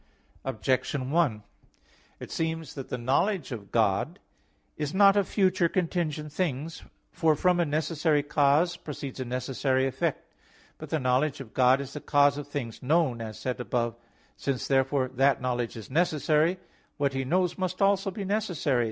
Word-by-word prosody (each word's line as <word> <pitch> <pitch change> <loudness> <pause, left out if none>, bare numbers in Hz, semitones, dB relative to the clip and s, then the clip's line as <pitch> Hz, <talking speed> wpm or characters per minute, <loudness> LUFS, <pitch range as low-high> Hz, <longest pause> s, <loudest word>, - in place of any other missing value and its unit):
Objection 130 +2 -1
1: 145 -11 +1 0.8
It - - -9
seems 160 -2 -3
that 135 -3 -7
the - - -2
knowledge 145 - 0
of 105 -5 -7
God - - +1 0.6
is 150 +2 -3
not 200 0 +6
of 200 -2 +2
future 185 -4 +2
contingent 160 -5 -2
things. 160 -2 -2 0.3
For 160 -2 +2
from 180 +3 +2
a 170 - +3
necessary 155 0 +1
cause 150 +4 +2
proceeds 140 -3 -7
a 130 - -2
necessary 130 +1 0
effect. 135 - -2 0.5
But - - -8
the 160 - 0
knowledge 130 +3 +1
of 125 -5 -10
God 130 +1 +4
is 140 -1 -6
the 150 - -6
cause 145 0 +3
of 145 - -7
things 130 -6 -5
known, 135 -4 +1
as 110 -1 -6
said 125 -1 -3
above 120 -1 -1
(A. - - -27
8). - - -33 0.4
Since 135 -3 -2
therefore 135 0 +2
that 135 0 +2
knowledge 125 -2 -2
is 110 +2 -10
necessary, 155 +2 +2 0.4
what 140 -2 0
He 135 0 -1
knows 180 +6 0
must 185 -1 -2
also 195 -1 +3
be 195 +1 -5
necessary. 185 - 0
145 Hz, 170 wpm, -28 LUFS, 130-170 Hz, 0.8 s, not